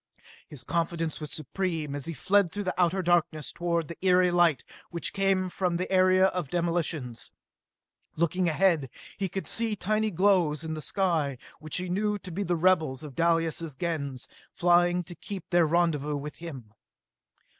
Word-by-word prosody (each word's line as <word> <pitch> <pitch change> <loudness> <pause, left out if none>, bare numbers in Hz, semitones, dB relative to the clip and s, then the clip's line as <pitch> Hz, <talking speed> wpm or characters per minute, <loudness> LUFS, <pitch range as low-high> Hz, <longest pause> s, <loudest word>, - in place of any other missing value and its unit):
His 140 -5 -6
confidence 165 0 -2
was 150 - -5
supreme 160 -2 -2
as 145 -1 -5
he 165 - -3
fled 190 +4 +2
through 205 +1 -4
outer 185 +1 +2
darkness 170 -3 +1
toward 170 -2 -1
the 170 - -9
eery 180 -1 +4
light 175 -5 +3 0.3
which 170 -1 -3
came 195 -1 +1
from 180 -1 -1
the 185 +2 -3
area 185 0 +5
of 180 -6 -1
demolitions. 165 -8 -2 0.9
Looking 170 +2 +1
ahead, 160 -5 +2 0.3
he 195 -2 -1
could 195 +2 -5
see 225 -2 +1
tiny 215 +3 0
glows 180 -5 +2
in 160 -1 -4
the 155 - -5
sky, 155 -4 0 0.2
which 155 0 -2
he 180 0 -2
knew 205 +3 0
to 185 -2 -10
be 185 +5 -3
the 175 -3 0
rebels 160 -6 +2
of 150 -3 -8
Dalis' 165 -1 +1
Gens, 140 -5 -3 0.3
flying 175 0 +3
to 175 - -9
keep 190 +1 -8
their 175 -2 +4
rendezvous 150 -3 +1
with 150 +2 -7
him. 135 -11 -9
170 Hz, 165 wpm, -28 LUFS, 155-185 Hz, 0.9 s, area